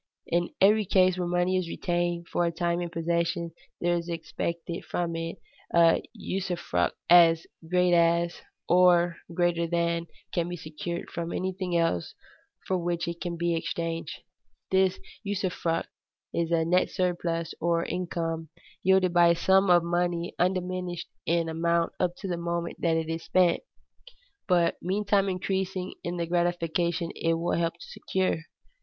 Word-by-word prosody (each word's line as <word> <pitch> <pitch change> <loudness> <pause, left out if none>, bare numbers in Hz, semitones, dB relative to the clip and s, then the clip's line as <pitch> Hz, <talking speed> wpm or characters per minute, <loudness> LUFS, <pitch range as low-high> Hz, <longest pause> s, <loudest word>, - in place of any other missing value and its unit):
In 175 0 0
every 210 +2 +5
case 185 -1 +4
where 180 -1 -2
money 175 +1 +1
is 180 -2 -2
retained 175 -1 -1
for 175 - 0
a 170 - +1
time 170 +1 -1
in 175 - -3
possession, 170 0 -1 0.3
there 175 0 +1
is 170 0 -3
expected 170 +1 -4
from 170 -1 -2
it 165 0 -4 0.4
a 170 -1 +5
usufruct 175 - -2
as 165 -1 +6 0.2
great 180 0 +3
as, 170 0 +2 0.3
or 175 -1 +5
greater 170 -1 +1
than, 170 0 0 0.3
can 170 0 0
be 175 - -4
secured 160 +2 -6
from 170 0 -4
anything 185 -1 -2
else 165 - 0 0.5
for 185 -1 0
which 175 0 -2
it 170 0 -5
can 175 -1 -3
be 170 0 0
exchanged. 165 0 -4 0.5
This 190 -1 +3 0.2
usufruct 185 -5 -1 0.5
is 170 -1 0
a 165 -1 +2
net 180 +2 +3
surplus, 170 -2 -1
or 170 0 +1
income, 165 -3 -3 0.3
yielded 190 -1 +3
by 175 -1 +6
a 170 - +5
sum 190 +2 +3
of 175 -1 +6
money 175 0 -1
undiminished 180 -1 -1 0.2
in 170 0 +2
amount 170 +1 0
up 175 -1 0
to 195 - -7
the 175 -2 -2
moment 170 0 -3
it 165 -1 +1
is 165 0 -4
spent, 180 -2 +3 0.9
but 175 -2 +3
meantime 200 +1 +1
increasing 185 0 -2
in 175 +1 -3
the 170 - -1
gratification 170 0 0
it 165 0 +1
will 170 +1 -1
help 170 0 0
to 170 - -12
secure. 190 -2 -1
170 Hz, 150 wpm, -27 LUFS, 170-180 Hz, 0.9 s, as